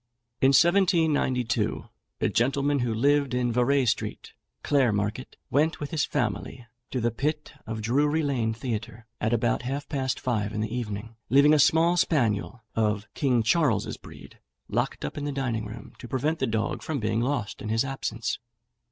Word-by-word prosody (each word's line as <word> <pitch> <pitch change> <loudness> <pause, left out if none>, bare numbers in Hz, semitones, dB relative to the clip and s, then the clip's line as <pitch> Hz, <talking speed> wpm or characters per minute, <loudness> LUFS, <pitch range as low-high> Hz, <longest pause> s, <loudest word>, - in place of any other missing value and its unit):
In 135 - +6
1792, 160 - +2 0.4
a - - +2
gentleman, 140 +4 +1
who 120 -2 0
lived 140 +3 +2
in 125 -1 +1
Vere 125 +3 +2
Street, 115 - -2 0.3
Clare 135 -5 +3
Market, 105 +5 -3
went 155 +3 +2
with 145 - -5
his 155 -3 +1
family 120 -1 -3 0.2
to 130 - -2
the 120 0 +1
pit 150 +6 -2
of 110 0 -4
Drury 145 +7 +2
Lane 125 -6 0
Theatre, 115 0 -5
at 110 - 0
about 120 0 +1
half 135 +3 -4
past 130 -4 -2
five 110 -4 -1
in 105 - -2
the 110 +2 -3
evening, 110 -1 -5
leaving 140 +3 +6
a 155 - +4
small 165 +4 +4
spaniel, 120 - +1
of 105 -1 0
King 125 -5 +2
Charles's 120 - +1
breed, - - -14 0.3
locked - - -2
up 70 - -5
in 145 - -4
the 145 - -1
dining 120 -6 -2
room, 105 +1 -10
to - - -8
prevent 150 +6 -1
the - - 0
dog 110 -1 -1
from 155 -3 -3
being 110 0 0
lost 125 -4 -2
in 110 - -5
his 115 +4 +1
absence. 115 -5 -3
125 Hz, 170 wpm, -26 LUFS, 110-145 Hz, 0.4 s, In